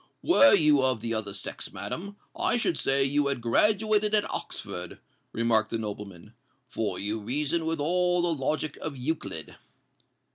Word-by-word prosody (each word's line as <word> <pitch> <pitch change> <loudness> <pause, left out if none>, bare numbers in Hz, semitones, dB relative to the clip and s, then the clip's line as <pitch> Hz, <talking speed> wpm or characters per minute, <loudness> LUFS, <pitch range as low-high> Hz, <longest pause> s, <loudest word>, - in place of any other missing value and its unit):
"Were 285 -5 +6
you 150 -3 +4
of 130 -4 +1
the 115 0 -2
other 110 -2 -2
sex, 100 - -5
madam, 200 +4 -6 0.2
I - - +1
should 200 -7 0
say 135 -1 +2
you 140 +1 +1
had 140 -2 -1
graduated 210 - +2
at 210 - +1
Oxford," 90 0 -5 0.3
remarked 110 -1 +1
the 115 - -1
nobleman; 105 -2 -7 0.3
"for 105 -6 -3
you 105 +2 -2
reason 150 +9 -1
with 165 -1 -1
all 180 +3 +1
the 175 -1 +1
logic 155 +2 -2
of 150 -3 -6
Euclid." 125 - -4
140 Hz, 155 wpm, -27 LUFS, 110-170 Hz, 0.3 s, Were